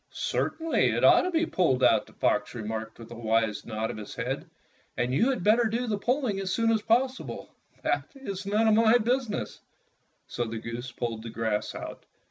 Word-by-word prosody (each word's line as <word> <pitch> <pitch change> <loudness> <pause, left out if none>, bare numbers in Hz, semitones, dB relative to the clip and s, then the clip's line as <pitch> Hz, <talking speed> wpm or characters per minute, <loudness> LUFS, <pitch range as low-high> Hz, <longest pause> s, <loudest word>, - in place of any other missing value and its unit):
"Certainly, 325 0 0
it - - -1
ought - - +7
to 365 - -1
be 335 -1 +1
pulled 135 - +1
out," - - +4
the - - -17
fox 105 +3 0
remarked 110 0 -5
with 115 0 -12
a - - -7
wise 110 -2 0
nod 110 0 -2
of - - -8
his 105 - -8
head, - - -3 0.5
"and 125 +1 0
you 225 - +3
had 255 -9 -1
better 225 +4 +4
do 230 +3 -1
the 220 -3 0
pulling 245 -3 0
as 190 -1 -2
soon 230 +2 +2
as 220 -1 +2
possible. 255 +4 -1 0.3
That - - 0
is 205 -8 -6
not 215 +2 +3
my 225 +2 +6
business." 235 - -1 0.7
So 120 - -3
the 115 0 -5
goose 115 +3 -6
pulled 115 -2 -4
the 115 - -7
grass 110 -2 -2
out. - - -7
185 Hz, 195 wpm, -28 LUFS, -, 0.7 s, ought